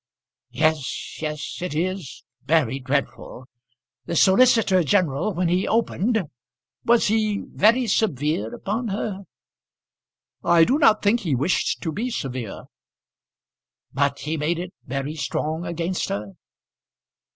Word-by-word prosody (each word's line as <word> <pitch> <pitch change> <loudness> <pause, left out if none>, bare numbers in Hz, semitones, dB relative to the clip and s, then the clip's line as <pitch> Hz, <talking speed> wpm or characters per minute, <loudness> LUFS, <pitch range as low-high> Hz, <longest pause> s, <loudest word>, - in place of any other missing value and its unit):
"Yes, 155 -3 -1
yes. 150 -1 -4
It 180 -4 -3
is 180 -2 -3 0.2
very 140 -3 +1
dreadful. 130 -1 -3 0.6
The 170 - -2
solicitor 195 -1 +5
general 160 +1 +1
when 180 +1 +1
he 180 +3 +1
opened, 225 0 +1 0.6
was 235 0 +3
he 215 -1 0
very 235 +5 +4
severe 150 - 0
upon 225 +4 -3
her?" 200 -1 -4 1.2
"I 170 -1 +5
do 265 - +2
not 220 -7 +4
think 210 +4 +3
he 165 - -1
wished 145 +9 0
to 160 - -2
be 225 +10 -3
severe." 130 - -5 1.3
"But 140 +1 0
he 155 +2 -2
made 155 +3 0
it 180 +2 -6
very 140 +4 -3
strong 160 +2 -3
against 170 +2 -2
her." 100 0 -4
170 Hz, 120 wpm, -23 LUFS, 145-205 Hz, 1.3 s, solicitor